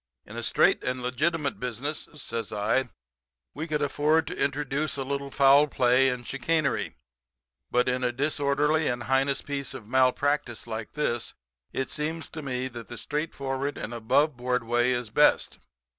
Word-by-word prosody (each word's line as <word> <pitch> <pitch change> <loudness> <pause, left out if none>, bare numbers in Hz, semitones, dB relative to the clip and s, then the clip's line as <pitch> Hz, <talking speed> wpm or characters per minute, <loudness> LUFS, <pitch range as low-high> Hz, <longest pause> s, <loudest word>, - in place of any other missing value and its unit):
In - - -11
a - - -3
straight - - +3
and 125 0 -2
legitimate 145 +4 0
business,' 125 +5 -4
says 115 -6 -5
I, 110 +5 +1 0.6
'we 155 +4 -5
could 150 -2 0
afford 150 +3 +2
to 180 +4 -5
introduce 145 +1 -1
a 135 - -1
little 140 +1 -3
foul 140 +2 +6
play 130 -1 +4
and 125 -1 -4
chicanery, 140 +3 0 0.7
but 125 0 +2
in 125 0 0
a 125 - +2
disorderly 145 +3 +1
and 120 -1 -1
heinous 135 +3 +1
piece 140 -1 -4
of 120 -5 -8
malpractice 130 0 +1
like 110 -1 -5
this 120 -6 -2 0.4
it 135 - -3
seems 160 +2 -3
to 160 - -7
me 130 -2 -2
that 120 -2 -8
the 120 - -8
straightforward 140 0 -3
and 115 - -5
aboveboard 125 +1 +1
way 120 +2 +2
is 120 -2 -1
the - - -29
best. - - +3
135 Hz, 160 wpm, -27 LUFS, 125-145 Hz, 0.7 s, foul